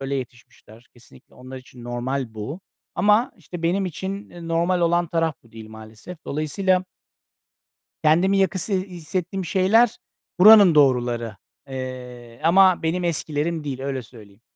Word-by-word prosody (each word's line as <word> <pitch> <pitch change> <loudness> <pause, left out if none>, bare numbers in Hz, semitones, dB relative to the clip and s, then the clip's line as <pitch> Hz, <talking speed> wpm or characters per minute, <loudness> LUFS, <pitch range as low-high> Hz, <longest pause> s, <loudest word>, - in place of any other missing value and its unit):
böyle 135 +1 -3
yetişmişler. 120 -2 -10
Kesinlikle 115 - -20
onlar 130 +1 -11
için 125 -1 -15
normal 120 0 -4
bu. 130 - -6 0.3
Ama, 210 +4 +2
işte, 175 -1 -10
benim 185 +3 0
için, 190 +4 -6
eee, 170 -1 -10
normal 170 +2 +1
olan 170 0 +2
taraf 165 -1 -1
bu 115 - -23
değil 110 -1 -11
maalesef. 110 +10 -11
Dolayısıyla 185 +5 0 1.2
kendimi 180 +6 +3
yakın 195 +1 0
hissettiğim 185 0 -3
şeyler 205 +6 +3 0.4
buranın 205 -3 +8
doğruları, 120 -6 +2 0.3
eee, 125 -2 -8
ama 185 +1 +5
benim 170 +3 -1
eskilerim 160 -1 -2
değil, 135 -3 -5
öyle 135 -1 -3
söyleyeyim. 105 -3 -16
155 Hz, 130 wpm, -22 LUFS, 125-185 Hz, 1.2 s, buranın